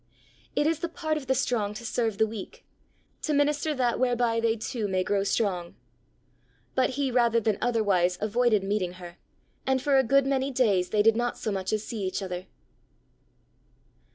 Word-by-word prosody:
It 295 - +2
is 320 0 +1
the 340 - -3
part 315 -2 -2
of 290 -4 -5
the 265 - +2
strong 220 -5 0
to 235 - -8
serve 225 -3 -1
the 220 - +4
weak, 215 -2 -8 0.6
to 305 - 0
minister 295 +1 +1
that 245 -3 0
whereby 240 -2 +1
they 230 0 +2
too 220 -1 -3
may 185 -1 0
grow 200 +1 0
strong. 185 -4 -1 1.0
But 260 0 +2
he 275 -2 0
rather 235 -2 +3
than 215 -2 0
otherwise 200 -7 +2
avoided 220 -1 +2
meeting 195 -3 -1
her, 175 -1 -11 0.5
and 265 0 +2
for 275 0 +3
a - - +4
good 275 +2 +3
many 270 0 0
days 210 -9 +2
they 210 +1 +2
did 225 0 +5
not 240 +1 -1
so 215 - -3
much 190 -1 -2
as 215 -1 -1
see 225 -3 -5
each 190 +1 -2
other. 180 0 -5
230 Hz, 180 wpm, -27 LUFS, 200-260 Hz, 1.0 s, did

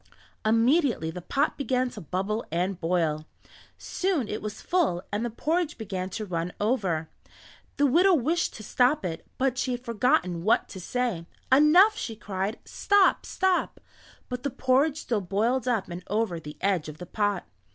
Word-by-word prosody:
Immediately 230 - +2
the 180 - -7
pot 275 - 0
began 255 -2 0
to 210 - -9
bubble 195 +7 -2
and 180 +2 -1
boil. 165 -3 0 0.5
Soon 360 - -1
it 210 - -4
was 215 0 -6
full 305 - 0
and 205 +3 -1
the 240 - -1
porridge 315 +7 -1
began 190 -4 -4
to 215 +3 -5
run 175 -2 -3
over. 195 -8 0 0.7
The 285 - +4
widow 355 +7 +5
wished 320 +5 0
to 215 - -9
stop 250 +1 +2
it, 165 -2 -4
but 260 -1 0
she 255 - 0
had 245 +1 -6
forgotten 230 - +1
what 215 - +3
to 190 - -8
say. 210 -4 -2 0.2
"Enough!" 325 +10 +6
she 225 - -5
cried. 200 0 -3
"Stop! 405 -2 +2
Stop!" 375 -1 0 0.5
but 250 0 -5
the 280 - -1
porridge 270 +4 +2
still 230 -4 -1
boiled 220 +8 0
up 225 -6 0
and 175 0 -7
over 205 -4 -1
the 150 -1 -10
edge 185 -5 0
of 155 - -9
the 180 - -8
pot. 205 0 -1
220 Hz, 170 wpm, -27 LUFS, 185-265 Hz, 0.7 s, Enough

